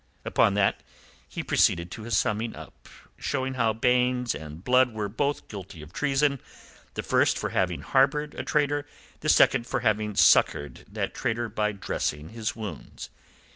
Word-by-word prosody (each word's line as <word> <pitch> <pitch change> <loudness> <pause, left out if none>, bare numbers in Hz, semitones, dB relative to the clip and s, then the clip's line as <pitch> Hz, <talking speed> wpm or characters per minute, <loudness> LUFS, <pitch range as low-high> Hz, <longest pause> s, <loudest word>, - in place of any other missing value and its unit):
Upon 100 - +3
that 100 -1 +2 0.5
he - - -5
proceeded 85 +1 +2
to 115 - -7
his 110 -2 0
summing 110 +2 -1
up, - - -13 0.3
showing 130 -1 -2
how 115 -3 +2
Baynes 125 +1 +1
and 75 +3 -9
Blood 125 0 +3
were 105 -1 -2
both 140 +8 -2
guilty 95 -6 -9
of 75 - -14
treason, 140 -1 +1 0.5
the - - -3
first - - +2
for - - -2
having - - 0
harboured 145 +3 +2
a - - -5
traitor, 145 -1 0 0.3
the 155 - -2
second 125 -4 +4
for 125 - -1
having 110 -2 0
succoured 75 -5 +3
that - - -3
traitor 115 0 -2
by 105 -1 -1
dressing 75 -6 -3
his 115 0 -4
wounds. 110 -3 -8
115 Hz, 160 wpm, -26 LUFS, 105-130 Hz, 0.5 s, second